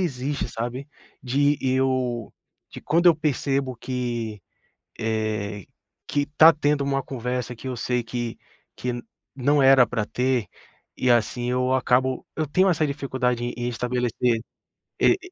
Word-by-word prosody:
existe, 140 -4 -2
sabe. 120 +5 -5 0.3
De 140 +3 +2
eu 130 -3 0 0.4
de - - -9
quando 170 +4 +2
eu 170 - +8
percebo 135 -3 -1
que, 120 -4 -3 0.6
eh, 110 -2 -2 0.4
que 145 - 0
está 155 +3 +6
tendo 145 -2 +1
uma 135 0 0
conversa 125 -1 -4
que 130 - -10
eu 125 - -4
sei 125 +1 -1
que 120 -1 -4 0.4
que 125 0 -2 0.4
não 140 +2 +3
era 135 -1 +7
pra 115 -3 -2
ter, 125 -3 0 0.5
e 125 - +1
assim, 120 +1 +1
eu 125 +1 +1
acabo 130 0 +1
eu 155 - 0
tenho 185 +6 +3
essa 155 -3 +1
dificuldade 130 -4 -1
em 120 - -2
em 120 0 -2
estabelecer 125 -1 0 0.6
e - - +5
125 Hz, 140 wpm, -24 LUFS, 120-140 Hz, 0.6 s, eu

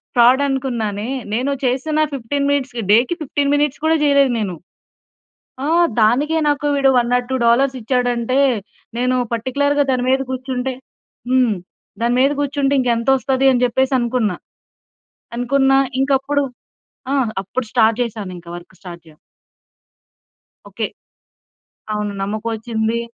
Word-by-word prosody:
ఫ్రాడనుకున్నానే, 245 -4 +2 0.3
నేను 255 +5 0
చేసిన, 270 +5 0 0.2
15 280 +2 -2
మినిట్స్‌కి 260 -4 -1
డే‌కి 245 +10 +4
15 285 -1 -1
మినిట్స్ 290 0 0
కూడా 320 +1 +3
చెయ్యలేదు 280 -3 +4
నేను. 195 -5 -3 1.1
ఆ! - - -1 0.3
దానికే 275 +9 +3
నాకు 290 0 0
వీడు 275 -1 +3
1 240 0 +1
ఆర్ 245 - -3
2 - - +1
డాలర్స్ 260 +3 +3
ఇచ్చాడంటే, 245 +1 0 0.6
నేను 255 0 +1 0.2
పర్టిక్యులర్‌గా 285 +5 +1
దాని 250 -1 0
మీద 265 +1 +2
కూర్చుంటే 260 0 -3 0.6
హ్మ్. 250 -4 +3 0.5
దాని 240 +1 +1
మీద 275 +2 +4
కూర్చుంటే, 280 -1 0
ఇంక 250 - 0
ఎంతొస్తది 270 +2 +2
అని 250 -1 +1
చెప్పేసి 260 +2 0
అనుకున్నా. 235 -6 0 1.0
అనుకున్న 270 +2 +2 0.3
ఇంక 270 - 0
అప్పుడు 285 +1 0 0.7
ఆహ్, 260 -5 +1
అప్పుడు 225 +5 -4
స్టార్ట్ 225 -2 +3
చేశాను. 215 -5 -5
ఇంక 170 - -17
వర్క్ 175 +2 -13
స్టార్ట్ 175 -2 -10
యా 155 - -21 1.5
ఓకే. - - -3 1.1
అవును. 210 -1 -2
నమ్మకం 215 +3 -3
వచ్చింది. 220 0 -2
255 Hz, 125 wpm, -19 LUFS, 230-275 Hz, 1.5 s, డే‌కి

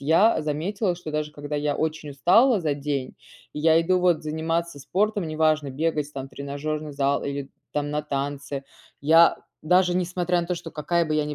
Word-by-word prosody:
я 165 +10 +4
заметила, 175 +5 -1
что 160 -3 -7
даже 150 0 -2
когда 145 0 -7
я 145 0 0
очень 155 -1 -2
устала 215 - +4
за 155 -4 0
день, 140 -2 -3 0.4
и 150 - -5
я 160 +1 +5
иду 180 +2 +2
вот 175 -3 +2
заниматься 160 0 -2
спортом- 200 - 0
неважно 155 -2 +1
бегать 150 +1 -1
там, 135 -1 -5
тренажерный 145 +3 -4
зал 140 0 +1
или 140 -1 -4 0.2
там 145 0 -1
на 150 - -1
танцы. 140 0 -4 0.4
Я 165 +3 +6 0.3
даже 180 +2 +3
несмотря 180 0 0
на - - -5
то, 180 - -1
что 165 -1 -8
какая 170 +3 0
бы 155 - -1
я 155 -1 +1
ни 150 0 -4
155 Hz, 185 wpm, -25 LUFS, 145-170 Hz, 0.4 s, Я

